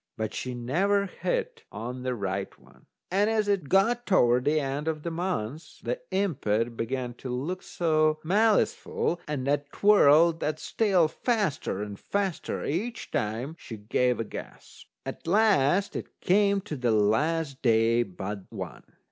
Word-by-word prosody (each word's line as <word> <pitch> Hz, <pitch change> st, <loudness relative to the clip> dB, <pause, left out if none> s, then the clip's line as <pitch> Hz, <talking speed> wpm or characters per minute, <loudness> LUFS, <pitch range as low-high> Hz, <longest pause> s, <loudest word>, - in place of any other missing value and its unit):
But 110 Hz, -1 st, -3 dB
she 125 Hz, -1 st, -4 dB
never 190 Hz, +12 st, +1 dB
hit 485 Hz, -, -3 dB
on 125 Hz, +2 st, -6 dB
the 125 Hz, 0 st, -2 dB
right 100 Hz, -2 st, -4 dB
one. -, -, -22 dB, 0.2 s
And 200 Hz, +3 st, +3 dB
as 215 Hz, -2 st, +1 dB
it 195 Hz, -8 st, 0 dB
got 235 Hz, +5 st, +3 dB
toward 125 Hz, -, +4 dB
the 155 Hz, +2 st, +3 dB
end 140 Hz, +2 st, -3 dB
of 155 Hz, -2 st, -2 dB
the 170 Hz, -, -3 dB
month, 160 Hz, -, -4 dB
the -, -, -2 dB
impet 120 Hz, -, 0 dB
began 125 Hz, +1 st, -3 dB
to 130 Hz, -, -6 dB
look 145 Hz, +10 st, -3 dB
so 155 Hz, -2 st, +1 dB
maliceful, 200 Hz, -2 st, +1 dB
and 145 Hz, -4 st, -3 dB
that 145 Hz, +1 st, 0 dB
twirled 165 Hz, -5 st, +5 dB
that's 150 Hz, 0 st, -4 dB
tail 190 Hz, -7 st, +4 dB
faster 170 Hz, -, -1 dB
and 105 Hz, -1 st, -7 dB
faster 200 Hz, -4 st, -2 dB
each 220 Hz, +10 st, -3 dB
time 115 Hz, +9 st, -2 dB
she 110 Hz, -, -8 dB
gave 120 Hz, +4 st, 0 dB
a -, -, 0 dB
guess. 110 Hz, -, -10 dB, 0.2 s
At -, -, -7 dB
last 195 Hz, -2 st, +3 dB
it -, -, -7 dB
came 200 Hz, +1 st, +3 dB
to 185 Hz, -6 st, -6 dB
the 125 Hz, -3 st, 0 dB
last 135 Hz, +8 st, +1 dB
day 115 Hz, 0 st, +3 dB
but 100 Hz, -1 st, -5 dB
one. -, -, -7 dB
155 Hz, 155 wpm, -27 LUFS, 120-195 Hz, 0.2 s, twirled